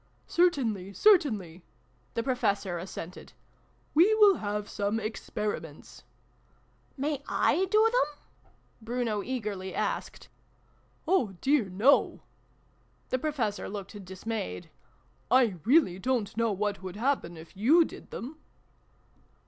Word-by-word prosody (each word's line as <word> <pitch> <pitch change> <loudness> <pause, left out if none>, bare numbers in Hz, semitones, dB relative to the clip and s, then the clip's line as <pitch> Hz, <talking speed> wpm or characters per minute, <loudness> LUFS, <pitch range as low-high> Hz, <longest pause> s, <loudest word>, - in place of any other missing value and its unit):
" - - -39
Certainly, 235 - +1
certainly! 215 - +3 0.2
" 125 -1 -38
the 230 - 0
Professor 200 -8 0
as 185 +3 -7
sented. 175 +3 -9 0.3
" - - -37
We 365 +8 +5
will 415 -3 +6
have 210 0 -3
some 205 +2 -1
Experiments." 210 -7 -5 0.5
" - - -37
May 290 +2 -1
/ 275 - -15 0.4
do 435 +2 +5
them? 295 -11 0 0.3
" - - -35
Bruno 230 -2 -2
eagerly 205 -6 -4
asked. - - -3 0.4
" - - -37
Oh 255 - +2
dear 275 -4 +2
no! 205 +9 +3 0.4
" - - -38
The 255 - +1
Professor 245 -9 -2
looked 200 0 -7
dis 185 +2 -11
mayed. 215 - -4 0.3
" 125 +4 -37
I 240 -7 +4
really 245 - +4
don't 235 -3 -1
know 230 -1 +1
what 205 0 -2
would 185 -1 -7
happen 225 -8 -1
if 160 +4 -13
you 295 - +5
did - - -11
them 275 +7 -7
220 Hz, 140 wpm, -29 LUFS, 190-275 Hz, 0.5 s, will